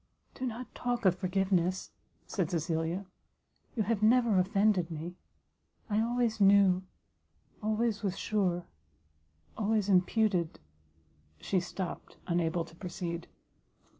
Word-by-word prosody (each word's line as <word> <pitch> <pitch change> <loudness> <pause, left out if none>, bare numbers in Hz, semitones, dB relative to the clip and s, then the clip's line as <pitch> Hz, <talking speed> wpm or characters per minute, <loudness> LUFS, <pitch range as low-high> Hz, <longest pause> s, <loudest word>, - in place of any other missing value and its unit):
"Do 260 - -3
not 245 +1 -6
talk 245 -2 -2
of 185 - +6
forgiveness," 185 -1 0 0.3
said 185 -6 -1
Cecilia, 165 +3 -1 0.7
"you 220 - +1
have 215 0 0
never 225 -2 +5
offended 195 -1 +2
me; 165 +2 -5 0.8
I 210 +1 +3
always 235 -2 0
knew 195 -2 +6 0.8
always 215 0 0
was 195 -3 -2
sure 180 -5 0 0.9
always 210 -1 +1
imputed 185 -2 +2 0.4
" 80 - -38 0.3
she 190 - +1
stopt, 180 +1 -6
unable 170 -1 0
to 165 - -16
proceed. 170 -1 -5
195 Hz, 110 wpm, -31 LUFS, 175-215 Hz, 0.9 s, of